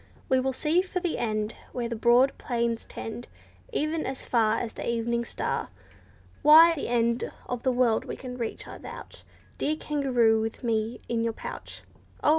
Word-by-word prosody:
We 260 -1 +4
will 265 +1 0
seek 320 +7 +1
for 365 - -2
the 350 -2 -2
end, 215 -1 -1 0.2
Where 240 -1 -2
the 235 - -3
broad 240 +4 +4
plains 235 -2 -1
tend, 230 +2 -7 0.4
E'en 310 +2 -1
as 265 0 -5
far 225 -2 +2
as 235 - -3
the - - -4
evening 235 0 0
star. - - -2 0.7
Why, 320 +3 +9
the 300 - -4
end 235 0 +1 0.2
of 245 -1 -3
the 260 - +2
world 245 -3 +2
we - - -5
can 250 -1 -7
reach, 235 -3 -4
I - - -9
vouch, - - -10 0.4
Dear 305 - +1
kangaroo, 250 -8 +2
with 225 +3 -4
me 225 0 -1
in 235 -1 0
your 230 0 0
pouch." - - -8 0.4
Oh! - - +4
240 Hz, 180 wpm, -27 LUFS, 230-270 Hz, 0.7 s, Why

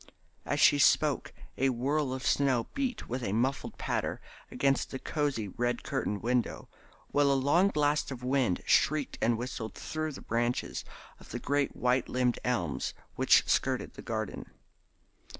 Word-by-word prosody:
As 145 - 0
she 145 -1 +6
spoke 145 0 +3 0.3
a 135 +1 +3
whirl 135 +3 0
of 130 0 -4
snow 130 -5 +2
beat 260 -5 -2
with 125 +2 -3
a 95 - -1
muffled 130 +5 -1
patter - - -2 0.3
against 135 -1 +1
the 130 - -4
cosy 140 -7 -2
red 120 +4 -2
curtained 105 0 -2
window, 125 0 0 0.4
while 145 -1 +3
a - - +3
long 145 +8 +4
blast 150 -4 +1
of 125 -3 -7
wind 125 -8 +1
shrieked 150 -2 +2
and 115 0 +2
whistled 120 -2 -5
through 155 -1 -4
the - - -9
branches 120 +2 -1 0.4
of - - -15
the - - -4
great 145 0 0
white 125 0 +1
limbed 125 -1 +1
elms 95 - -1 0.2
which - - +4
skirted - - 0
the - - -10
garden. - - -4
130 Hz, 155 wpm, -30 LUFS, 120-145 Hz, 0.4 s, she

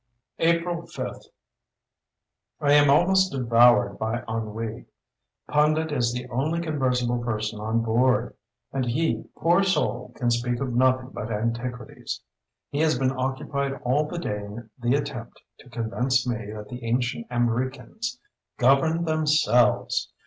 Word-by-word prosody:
April 170 +1 +1
5.—I 145 -3 -7
am 145 -1 +6
almost 190 +6 +4
devoured 120 -4 +4
by 110 +2 -2
ennui. 115 +1 -4 0.6
Pundit 155 +1 +2
is 120 -5 +1
the 125 +1 -5
only 145 +8 -1
conversible 125 -7 0
person 110 -2 -2
on 110 +2 0
board; 120 +1 +2 0.4
and 135 - 0
he, 155 +7 0
poor 175 +3 +3
soul! 195 -1 0
can 120 -2 0
speak 120 +1 0
of 130 -3 -2
nothing 130 +1 +2
but 110 +2 -5
antiquities. 115 +2 -4 0.5
He 140 - -2
has 155 -4 +3
been 130 0 +1
occupied 135 +1 -2
all 145 +5 +1
the 175 - -6
day 105 -11 -2
in 110 +2 -9
the 120 +2 +2
attempt 140 -5 -4 0.2
to 125 - -16
convince 125 +2 0
me 110 -4 -3
that 105 -1 -8
the 125 -1 -8
ancient 120 +1 -1
Amriccans 130 - -2 0.4
governed 150 +6 +3
themselves! 155 -7 +2
125 Hz, 130 wpm, -25 LUFS, 115-145 Hz, 0.6 s, am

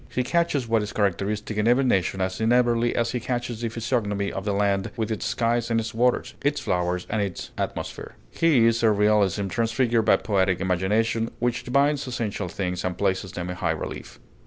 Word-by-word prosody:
He 125 - -1
catches 145 -3 0
what 115 -1 +2
is 105 -1 -5
characteristic 105 +2 -1
in 105 +1 +1
every 125 +3 +4
nation 95 -6 +1
as 95 +2 -2
inevitably 120 0 +2
as 115 0 0
he 125 - -2
catches 120 -1 -3
the 115 - -1
physiognomy 110 -4 -1
of 95 +2 -5
a - - +2
land 100 -1 +1
with 110 -1 -2
its 110 - -2
skies 115 +1 0
and 115 -1 +2
its 110 -1 -4
waters, 120 +2 +1
its 145 +1 +1
flowers 90 0 -1
and 110 0 -1
its 100 -3 -4
atmosphere. - - -5 0.2
His 120 -9 +3
is - - -3
a 115 - +5
realism 105 -1 +2
transfigured 115 +2 +1
by - - +5
poetic 95 -4 +1
imagination, 105 +5 0
which 120 +1 -1
divines 140 +2 +2
essential 110 -6 -3
things 90 0 -3
and 90 -1 -2
places 95 -1 -1
them 90 -1 -4
in 90 - -6
high 85 - -1
relief. - - -7
110 Hz, 195 wpm, -25 LUFS, 100-120 Hz, 0.2 s, a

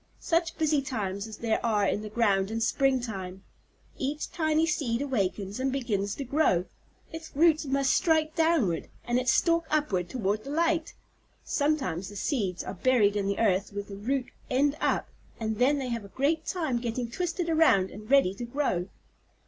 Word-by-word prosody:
Such 335 -1 0
busy 305 -2 +2
times 205 -7 -3
as 215 -1 -9
there 225 -1 -1
are 215 -3 +2
in 205 - 0
the 215 - -6
ground 205 -3 +2
in 225 +1 -2
spring 260 +3 +2
time! 190 -5 -6 0.6
Each 290 +3 -3
tiny 315 -1 +2
seed 275 -7 0
awakens 205 -6 -2
and 265 +1 0
begins 210 -7 -1
to 280 - -4
grow. 255 - +2 0.5
Its 320 0 -8
roots 315 0 +4
must 275 0 +2
strike 315 -2 +2
downward, 320 - +2 0.2
and 240 +1 +1
its 255 0 +2
stalk 335 +1 +2
upward 210 - 0
toward 215 -3 -1
the - - -8
light. 330 +1 0 0.5
Sometimes 275 - -1
the 205 - -11
seeds 200 - -1
are - - -5
buried 210 -1 +3
in 200 -1 0
the 200 - -1
earth 200 -2 +1
with 205 0 -5
the 200 - -7
root 250 +6 -1 0.2
end 280 +3 +2
up, - - +1 0.3
and 220 -1 -2
then 275 +4 +4
they 265 -2 -3
have 230 -2 -3
a - - -9
great 295 +9 0
time 315 -10 -1
getting 235 0 -3
twisted 355 +3 -2
around 315 - +4
and 215 +3 -11
ready 275 -9 +5
to 220 - -7
grow." 240 -8 -1
250 Hz, 180 wpm, -28 LUFS, 205-300 Hz, 0.6 s, ready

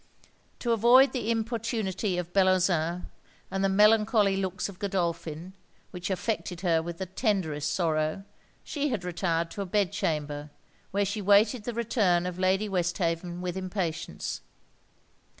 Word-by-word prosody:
To 240 - -1
avoid 240 +4 +6
the 240 -4 -3
importunity 220 -4 -1
of 175 0 -4
Bellozane, 180 -3 +2 0.5
and 195 0 -1
the 195 - +3
melancholy 210 0 +4
looks 190 -1 -2
of 195 -2 -11
Godolphin, 170 -3 -2 0.4
which 180 0 -5
affected 190 -2 -2
her 165 -3 +2
with 170 +1 -6
the 190 - -3
tenderest 180 - -1
sorrow, 155 0 0 0.4
she 295 -1 -2
had 220 -8 -2
retired 170 -2 -1
to 200 - -5
a - - -2
bed 200 -1 +1
chamber, 150 -1 -2 0.4
where 200 +1 +1
she 205 +2 -3
waited 210 +3 +4
the 240 - -3
return 205 -7 +2
of 180 0 -4
Lady 190 +3 +2
Westhaven 175 -2 -1
with 180 -1 -3
impatience. 185 -3 -3
190 Hz, 140 wpm, -28 LUFS, 175-210 Hz, 0.5 s, avoid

